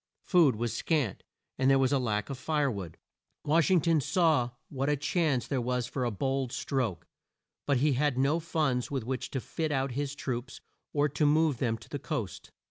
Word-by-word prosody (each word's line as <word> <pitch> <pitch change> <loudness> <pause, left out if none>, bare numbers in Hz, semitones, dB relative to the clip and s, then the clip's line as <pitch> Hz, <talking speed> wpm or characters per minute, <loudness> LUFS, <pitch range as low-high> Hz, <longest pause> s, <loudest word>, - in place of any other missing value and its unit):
Food 165 - +4
was 115 +1 -2
scant, 145 - 0 0.4
and 130 0 +4
there 135 - +6
was 130 -1 +2
a 140 - +3
lack 105 -2 -1
of 130 - -6
fire 145 0 +1
wood. 95 -7 -6 0.5
Wash 160 +3 +3
ing 185 -3 +5
ton 165 -2 +3
saw 155 -6 +2 0.2
what 135 +1 -1
a 150 - +3
chance 145 -3 +1
there 135 -3 -1
was 125 0 -1
for 125 +1 -3
a - - +1
bold 135 +4 -1
stroke, 120 - -2 0.6
but 140 -2 +3
he 145 +3 +3
had 135 0 +1
no 140 +5 +2
funds 150 -7 0
with 135 -4 -2
which 125 +1 -3
to 135 - -2
fit 155 +4 -3
out 135 -1 0
his 140 +2 -3
troops, 130 -2 -4 0.3
or 145 0 +2
to 145 +2 +1
move 155 -3 +3
them 115 -3 0
to 110 - -15
the - - -5
coast. - - -4
135 Hz, 205 wpm, -30 LUFS, 125-150 Hz, 0.6 s, there